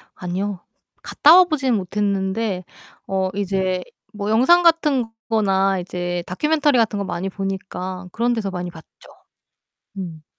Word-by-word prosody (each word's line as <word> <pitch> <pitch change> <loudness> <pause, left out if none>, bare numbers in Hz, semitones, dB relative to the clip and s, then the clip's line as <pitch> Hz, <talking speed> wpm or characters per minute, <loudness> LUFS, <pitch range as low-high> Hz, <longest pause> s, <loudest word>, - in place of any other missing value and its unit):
아니요. 185 +2 -3 0.4
갔다 310 +3 +6
와 370 - +9
보지는 270 -8 0
못했는데 195 +1 -1 0.4
어 190 -1 0
이제 190 -2 -1 0.3
뭐 205 0 -4
영상같은 300 +1 +4 0.2
거나 195 -3 +2
이제 175 -1 -4
다큐멘터리 295 - +2
같은 220 -3 +1
거 200 - -2
많이 190 +2 -3
보니까 190 -1 -5
그런데서 230 -2 0
많이 180 -1 -4
봤죠. 160 -1 -14 1.1
음. 165 -5 -7
195 Hz, 270 characters per minute, -21 LUFS, 185-230 Hz, 1.1 s, 와